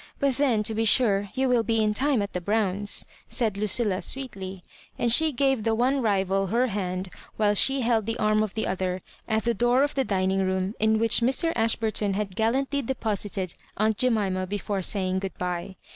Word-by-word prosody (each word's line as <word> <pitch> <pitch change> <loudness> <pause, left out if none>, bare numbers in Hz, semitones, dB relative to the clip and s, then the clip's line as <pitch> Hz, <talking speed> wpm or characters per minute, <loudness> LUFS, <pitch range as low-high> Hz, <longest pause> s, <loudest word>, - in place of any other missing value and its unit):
But 275 -3 +1
then, 250 -7 +2
to 220 +1 0
be 225 +1 0
sure, 205 -3 +3
you 265 0 +1
will 250 -2 +3
be 225 0 0
in 210 0 +1
time 265 -2 +1
at 200 - -7
the 180 - -3
Browns*," 205 0 -1 0.2
said 225 -6 0
Lucilla, 205 -1 +1
sweetly, 195 -9 -4 0.3
and 235 - +2
she 315 +6 +5
gave 270 -2 +1
the 225 0 +1
one 260 +4 +1
rival 195 -3 0
her 240 +6 +1
han4 185 -2 -4 0.2
while 210 -1 +2
she 270 +6 +3
held 230 -3 +1
the 225 +1 -2
arm 215 0 +2
of 215 -3 -3
the 220 - -1
other, 185 -1 -2 0.3
at 220 0 0
the 235 - +1
door 240 +3 +2
of 290 - -1
the 270 - 0
dining 190 -3 0
room, 190 +1 -1
in 220 0 +3
which 225 0 +3
Mr. 270 +7 +2
Ash 225 0 +2
burton 210 -3 -1
had 200 -2 -3
gallantly 265 +6 0
deposited 205 -7 -3 0.2
aunt 215 +1 +1
Jemima 200 -7 +1
be 205 +2 -3
fore 200 0 -3
saying 185 0 +1
good 190 -2 -6
bye. 180 +1 -4
215 Hz, 205 wpm, -25 LUFS, 195-240 Hz, 0.3 s, she